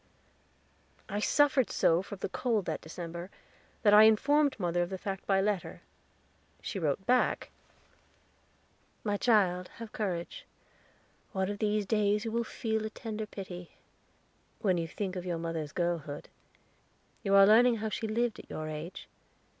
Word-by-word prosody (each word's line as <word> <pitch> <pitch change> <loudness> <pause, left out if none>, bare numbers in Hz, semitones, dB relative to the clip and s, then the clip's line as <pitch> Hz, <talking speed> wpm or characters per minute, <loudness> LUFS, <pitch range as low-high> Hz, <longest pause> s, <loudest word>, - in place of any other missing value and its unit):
I 205 - -2
suffered 275 +1 +3
so 165 +2 +3
from 200 +1 -8
the - - -2
cold 225 -3 0
that - - -3
December 170 +2 -7 0.5
that 205 -2 +6
I 210 +1 +9
informed 280 +5 +3
mother 175 -1 0
of 175 - -1
the 190 - -4
fact 195 0 -5
by 195 -1 +3
letter. 200 -2 -2 0.8
She 195 - -4
wrote 160 +3 -1
back: 250 0 +2 1.5
"My 205 -2 0
child, 190 -5 +2
have 230 -2 -8
courage. 180 -5 -4 0.9
One 190 -1 0
of 205 - -6
these 210 -1 +1
days 210 +1 +1
you 225 - -2
will 235 +1 0
feel 220 -1 -2
a 220 - -3
tender 215 -1 -5
pity, 180 -4 -8 0.9
when 185 -5 +2
you 165 - -2
think 190 +2 -4
of 180 - -4
your 175 -2 -1
mother's 165 -3 -4
girlhood. 165 -4 -3 0.9
You 200 -2 +2
are 195 0 +9
learning 235 +4 +6
how 220 0 -3
she 220 +1 -3
lived 230 +1 0
at - - -13
your 155 - -5
age. 155 +4 -7
200 Hz, 155 wpm, -31 LUFS, 175-220 Hz, 1.5 s, I